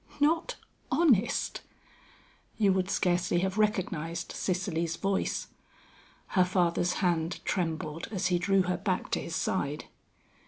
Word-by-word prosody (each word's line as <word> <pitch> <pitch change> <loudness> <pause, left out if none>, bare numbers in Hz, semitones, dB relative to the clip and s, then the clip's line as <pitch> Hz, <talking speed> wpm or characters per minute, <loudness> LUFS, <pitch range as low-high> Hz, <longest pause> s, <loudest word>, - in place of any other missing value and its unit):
"Not 320 +4 +2 0.4
honest?" 250 - +2 1.0
You 200 -3 +4
would 190 0 0
scarcely 175 -2 +1
have 190 +2 -1
recognized 170 -6 -1
Cicely's 170 -3 -1
voice. 195 0 -1 0.8
Her 185 - +4
father's 180 -1 +1
hand 170 -1 0
trembled 165 -2 -2
as 195 -5 -2
he 175 - +3
drew 195 +1 +3
her 180 0 -1
back 185 0 -2
to - - 0
his 165 - -5
side. 150 -5 -1
180 Hz, 120 wpm, -29 LUFS, 170-195 Hz, 1.0 s, You